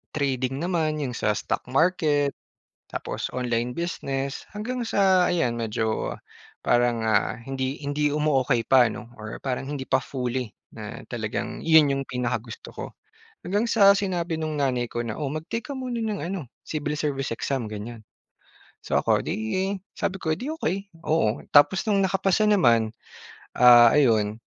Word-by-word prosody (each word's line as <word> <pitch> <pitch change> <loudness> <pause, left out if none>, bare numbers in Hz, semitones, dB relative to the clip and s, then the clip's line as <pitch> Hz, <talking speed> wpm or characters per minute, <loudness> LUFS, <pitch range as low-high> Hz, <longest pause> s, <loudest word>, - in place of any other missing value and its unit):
trading 135 -2 -1
naman 160 -4 0
yung 125 - -3
sa 105 - +1
stock - - -2
market 150 -1 +2 0.6
tapos - - -4
online 120 -1 -1
business, 140 -4 -3
hanggang 240 +4 -3
sa 190 -4 +4
ayan 125 -9 +1
medyo 110 -1 -2 0.5
parang 120 -1 +2
ah, 110 +1 +1
hindi 130 +2 -4
hindi 145 +1 0
umuokey 135 -5 +1
pa, 130 -2 +6
'no, 115 - -9
or 110 0 -7
parang 135 0 -3
hindi 140 -2 -3
pa - - +3
fully 125 -3 -3 0.2
na 110 -1 -7
talagang 110 -2 -4
yun 160 -3 +6
yung 135 0 -1
pinakagusto 120 -2 -4
ko. - - -5 0.6
Hanggang 205 +6 0
sa 200 -3 +7
sinabi 180 -4 -1
nung 155 -1 -2
nanay 125 -4 0
ko 120 - -3
na, 115 - -3
"Oh, 145 -3 -2
mag-take 155 +10 -4
ka 270 - -4
muna 250 -3 -3
ng 215 -2 -2
ano 175 -8 -5 0.2
civil 150 -1 -3
service 140 -3 -2
exam," 130 -2 -2
ganyan. 110 +2 -7 0.8
So, - - +1
ako - - +2
'di 185 - -2 0.2
sabi 195 0 -2
ko 160 -3 0
eh, - - -11
"'Di 265 +5 -4
okey." 190 - 0 0.3
Oo, 135 -9 +2 0.2
tapos 190 +9 +5
no'ng 200 -2 +3
nakapasa 195 +1 +1
naman 120 - +4 0.7
ah, 120 -1 +9
ayun 110 -6 +3
140 Hz, 155 wpm, -25 LUFS, 120-175 Hz, 0.8 s, ah